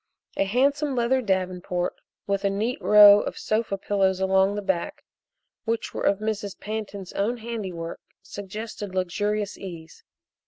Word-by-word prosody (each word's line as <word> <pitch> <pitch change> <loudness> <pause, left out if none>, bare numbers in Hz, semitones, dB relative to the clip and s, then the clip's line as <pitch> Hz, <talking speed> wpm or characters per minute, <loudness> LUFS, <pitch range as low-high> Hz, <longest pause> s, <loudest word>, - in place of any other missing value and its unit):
A 195 - +1
handsome 275 +6 +1
leather 250 +2 +2
davenport 185 -3 -1 0.3
with 200 0 -1
a 200 - +3
neat 220 +7 -2
row 205 -1 +9
of - - -5
sofa 215 -2 -1
pillows 190 -1 +1
along 190 +1 +3
the 205 - -3
back, 190 -3 -2 0.6
which 230 0 -2
were - - -4
of 200 - +3
Mrs. 210 -2 -4
Pantin's 205 -3 -5
own 225 +5 0
handiwork, 195 -8 -5 0.2
suggested 205 0 -7
luxurious 205 +3 -1
ease. 165 -4 -9
200 Hz, 135 wpm, -25 LUFS, 190-220 Hz, 0.6 s, row